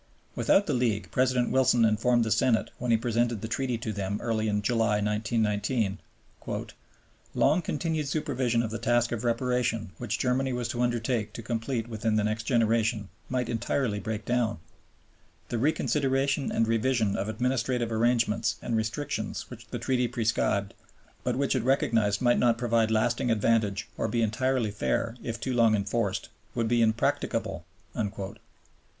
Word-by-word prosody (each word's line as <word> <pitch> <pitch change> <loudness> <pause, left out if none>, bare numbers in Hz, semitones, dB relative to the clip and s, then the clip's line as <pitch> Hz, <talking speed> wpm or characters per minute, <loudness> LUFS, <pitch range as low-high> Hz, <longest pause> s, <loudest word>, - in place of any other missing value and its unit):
Without 200 - +3
the 150 - -1
League, 120 -5 0
President 130 -1 +2
Wilson 130 -3 +4
informed 115 +2 +3
the 110 - -2
Senate 115 0 +2
when 125 - -3
he 115 - +5
presented 115 -1 0
the 110 - -4
Treaty 120 +2 -1
to 110 -1 -4
them 100 0 -2
early 110 -2 -1
in 105 -1 0
July, 115 -1 +2
1919, 105 0 0 1.4
"...long 155 +6 +3
continued 155 -1 -2
supervision 130 -5 0
of 110 - -3
the 115 - -4
task 120 0 +2
of 120 -1 -3
reparation 120 -3 0
which 110 -3 -2
Germany 130 +2 0
was 120 -1 -2
to 120 - -2
undertake 120 -2 0
to 115 - -7
complete 115 0 -2
within 110 -1 -1
the 105 - +2
next 110 +1 -2
generation 115 -3 +1 0.2
might 125 -1 -1
entirely 115 -1 -1
break 110 0 -4
down; 120 -5 0 0.9
the 120 - -1
reconsideration 140 -1 +1
and 115 - +1
revision 115 -2 +1
of 100 - -2
administrative 120 0 0
arrangements 115 -1 +1
and 115 - -2
restrictions 110 +6 -3
which - - -10
the - - -5
Treaty 125 -2 0
prescribed, 110 -4 0 0.5
but - - 0
which 140 0 +1
it 130 - +1
recognized 115 -4 +1
might 120 -1 +4
not 120 -2 +3
provide 115 -2 +2
lasting 115 +2 +1
advantage 110 -2 +1
or - - +1
be 115 +1 0
entirely 120 +1 0
fair 100 - -1
if 115 0 -4
too 130 +2 -2
long 115 -2 +4
enforced, 100 -1 -1 0.3
would 115 -2 0
be 120 +1 +2
impracticable." 110 -1 0
115 Hz, 155 wpm, -28 LUFS, 110-125 Hz, 1.4 s, he